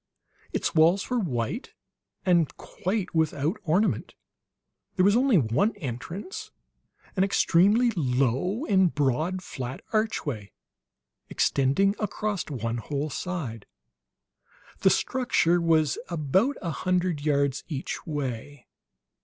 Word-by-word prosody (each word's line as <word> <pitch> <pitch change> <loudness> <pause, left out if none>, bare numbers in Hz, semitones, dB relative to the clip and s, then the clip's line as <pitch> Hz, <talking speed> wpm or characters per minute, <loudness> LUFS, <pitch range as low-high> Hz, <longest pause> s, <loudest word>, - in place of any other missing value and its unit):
Its - - -1
walls 170 +8 +3
were 250 - +2
white 120 - -3 0.5
and 170 -4 +2
quite 190 +1 -3
without 160 - 0
ornament; 180 +7 +1 0.8
there 185 - +3
was 205 +1 +5
only 250 -3 +4
one 150 - +2
entrance, 200 - -6 0.7
an 190 - +3
extremely 200 +5 +4
low 140 - 0
and 190 - +3
broad, 155 +7 0
flat 130 -5 -6
archway, 150 - -1 0.8
extending 140 +9 +2
across 210 -2 -2
one 115 -4 -3
whole 145 +5 -3
side. 135 - -4 1.1
The 190 - +5
structure 180 -7 +2
was 160 -3 +2
about 185 - +1
a 170 - -1
hundred 180 -2 0
yards 140 -2 +1
each 145 -5 -4
way. 145 -2 -4
165 Hz, 105 wpm, -26 LUFS, 140-195 Hz, 1.1 s, was